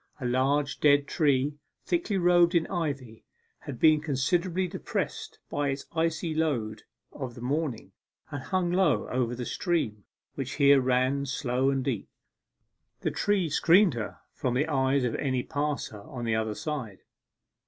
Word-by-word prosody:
A 130 - -5
large 135 +4 +1
dead 145 -1 +5
tree, 145 -1 +1 0.3
thickly 335 - 0
robed 175 -1 +4
in 165 -1 +3
ivy, 140 - -4 0.4
had 130 -4 -8
been 155 -1 +5
considerably 170 +6 0
depressed - - -4
by 145 -1 -1
its 135 0 -3
icy 165 0 -1
load 120 -10 -1 0.3
of 130 -4 -6
the - - -10
morning, 140 0 -2 0.4
and 145 - -4
hung 180 +4 -1
low 180 -5 +2
over 125 -1 -1
the 125 0 -5
stream, 115 - -1 0.3
which 135 -1 -4
here 140 -2 +5
ran 130 +2 +1
slow 130 0 0
and 135 -1 0
deep. 120 -8 -2 0.9
The - - 0
tree 205 -4 +1
screened 170 +4 +4
her 115 -3 -5 0.2
from 125 -2 -2
the 140 +4 +2
eyes 135 -2 +2
of 125 - 0
any 130 -3 -1
passer 145 -7 -3
on 120 +3 -7
the 115 - 0
other 110 -1 -1
side. 135 - -5
140 Hz, 155 wpm, -28 LUFS, 125-160 Hz, 0.9 s, dead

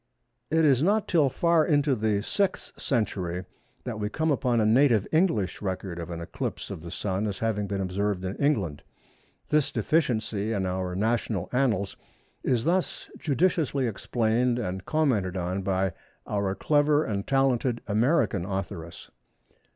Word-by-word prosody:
It 160 +1 +3
is 135 -3 +4
not 205 +6 +2
till 155 -6 +3
far 170 +4 +3
into 145 -3 +2
the 110 -3 +1
6th 200 - -1
century 95 -7 -1 0.4
that 115 -4 -4
we 105 0 -1
come 160 +7 0
upon 125 -4 +1
a 110 - +3
native 115 -2 +4
English 155 - +1
record 95 -3 -4
of 85 0 -6
an 85 -1 -5
eclipse 85 - -5
of - - -6
the 85 - -8
Sun 95 +3 -2
as 100 -2 -3
having 105 -2 -1
been 100 0 -2
observed 95 0 -1
in 95 +2 -3
England. 100 - 0 0.7
This 150 -2 +2
deficiency 115 -5 0
in 100 -3 -1
our 90 0 -2
national 110 -2 -1
annals 110 -7 +1 0.5
is 120 -3 +1
thus 180 +4 -1
judiciously 150 -3 +1
explained 120 +2 0
and 95 -5 -4
commented 115 - +1
on 90 +2 -2
by 95 -1 0 0.3
our 100 -2 -1
clever 150 +2 +3
and 100 -2 -3
talented 130 -3 +2
American 115 - +2
authoress. 90 -3 -5
110 Hz, 150 wpm, -27 LUFS, 95-140 Hz, 0.7 s, is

